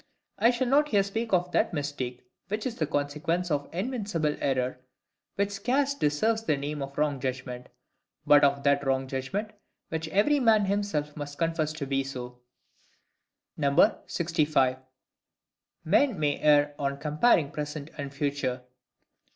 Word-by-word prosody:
I 230 - +5
shall 250 +1 0
not 285 +4 +3
here 205 -8 +3
speak 220 +3 -3
of 180 -1 +1
that - - +1
mistake 135 -4 -4 0.2
which 210 +2 -3
is 245 -3 -3
the 155 - 0
consequence 155 +4 -1
of 145 -1 -1
INVINCIBLE 195 - -2
error, 130 -2 -1 0.6
which 200 0 0
scarce 260 +8 0
deserves 220 - +1
the 150 -9 +1
name 145 +1 -4
of 140 0 -6
wrong 145 -2 +1
judgment; 125 -1 -5 0.6
but 145 -1 +6
of 140 0 +3
that 140 0 +3
wrong 135 -1 0
judgment 140 +12 -3 0.4
which 160 0 -3
every 210 - +3
man 220 -5 +4
himself 195 -7 -1
must 145 -1 -7
confess 165 -2 0
to 155 -2 -4
be 135 0 0
so. 125 -2 -7 1.7
65. 150 -6 +1 1.1
Men 260 - +3
may 145 -2 0
err 145 -1 +4
on 140 0 -1
comparing 150 +2 +2
Present 150 0 -5
and 140 -2 -5
Future. 140 -3 -2
150 Hz, 145 wpm, -28 LUFS, 140-200 Hz, 1.7 s, but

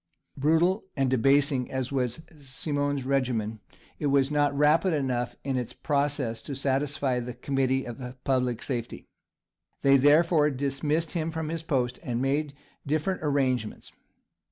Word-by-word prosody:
Brutal 165 +8 +2
and 135 -2 +1
debasing 135 +1 +3
as 130 -1 -3
was 130 +2 -2 0.2
Simon's 145 0 -2
regimen, 120 -5 0 0.4
it 150 - 0
was 140 0 +3
not 145 -1 +1
rapid 155 +5 +4
enough 125 -4 -1
in 135 -2 -1
its 125 -2 -3
process 140 -5 -1
to 140 - -6
satisfy 135 -1 0
"the 120 0 -6
Committee 135 +1 0
of 125 +1 -7
Public 125 -3 0
Safety;" 120 -4 -4 0.8
they, 140 0 +6
therefore, 150 +2 +4
dismissed 145 +4 -1
him 165 -2 -2
from 160 -1 -4
his 165 0 -3
post, 130 -6 -1
and 120 -1 -3
made 140 +2 0 0.3
different 155 +6 -1
arrangements. 130 -7 -1
140 Hz, 135 wpm, -27 LUFS, 130-150 Hz, 0.8 s, they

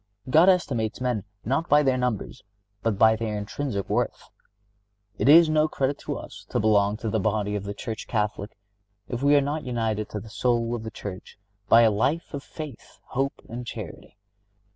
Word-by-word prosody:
God 165 +7 +7
estimates 120 - +1
men 125 -5 -1 0.2
not 140 +8 0
by 150 0 +6
their 135 -2 +3
numbers, 125 -1 -2 0.4
but 110 -2 0
by 110 +1 +6
their 110 -1 -3
intrinsic 105 0 -3
worth. - - -2 0.9
It - - +3
is 165 +2 +9
no 155 0 +3
credit 140 -2 -1
to - - -4
us - - -10
to - - 0
belong 105 -1 +3
to 110 0 -3
the 110 - +1
body 105 0 0
of 100 -1 -4
the 100 0 -5
Church 110 -1 -6
Catholic 105 -2 -2 0.5
if 120 0 -4
we 145 +1 +5
are 145 - +5
not 145 +3 -2
united 110 -4 -2
to 105 - -4
the 110 - -11
soul 120 -1 0
of 120 - -3
the 110 - -5
Church 100 -3 -8 0.3
by 115 +1 +7
a 110 - +5
life 135 +13 -1
of 140 - -4
faith, 150 -3 -10
hope 135 +1 -2
and 120 +2 -6
charity. 115 -3 -8
115 Hz, 185 wpm, -25 LUFS, 105-140 Hz, 0.9 s, is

